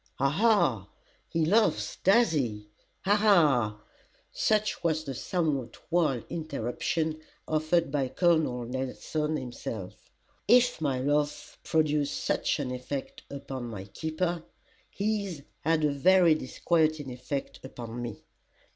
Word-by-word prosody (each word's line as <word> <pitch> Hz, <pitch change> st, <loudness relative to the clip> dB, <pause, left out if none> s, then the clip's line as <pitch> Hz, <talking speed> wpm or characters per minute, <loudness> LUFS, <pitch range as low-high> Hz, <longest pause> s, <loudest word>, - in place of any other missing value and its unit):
"Ha! 140 Hz, -, +2 dB
Ha! 150 Hz, -, +2 dB, 0.4 s
he 165 Hz, -1 st, +1 dB
laughs 215 Hz, +6 st, +2 dB
does 200 Hz, +1 st, +4 dB
he 110 Hz, -9 st, -2 dB, 0.3 s
Ha! 200 Hz, +2 st, +3 dB
Ha!" 150 Hz, -, +4 dB, 0.5 s
such 215 Hz, -2 st, +1 dB
was 160 Hz, -2 st, +1 dB
the 140 Hz, -3 st, -5 dB
somewhat 150 Hz, -3 st, -2 dB
wild 155 Hz, -9 st, +2 dB
interruption 155 Hz, +2 st, -2 dB, 0.3 s
offered 155 Hz, 0 st, +1 dB
by 140 Hz, -2 st, 0 dB
Col. 170 Hz, +5 st, +3 dB
Nelson 130 Hz, +3 st, -2 dB
himself. 115 Hz, -7 st, -7 dB, 0.4 s
If 245 Hz, -5 st, +4 dB
my 135 Hz, -4 st, 0 dB
laugh 145 Hz, +2 st, -1 dB
produced 150 Hz, -3 st, +1 dB
such -, -, 0 dB
an 140 Hz, -4 st, -3 dB
effect 130 Hz, +2 st, -5 dB
upon 135 Hz, -2 st, -6 dB
my 110 Hz, -5 st, -6 dB
keeper, 160 Hz, -, -3 dB, 0.5 s
his 200 Hz, -7 st, -2 dB, 0.2 s
had 160 Hz, 0 st, +1 dB
a 150 Hz, -, +3 dB
very 175 Hz, +4 st, +5 dB
disquieting 155 Hz, 0 st, 0 dB
effect 125 Hz, +3 st, -5 dB
upon 120 Hz, -2 st, -7 dB
me. 120 Hz, -4 st, -6 dB
150 Hz, 120 wpm, -28 LUFS, 130-170 Hz, 0.5 s, very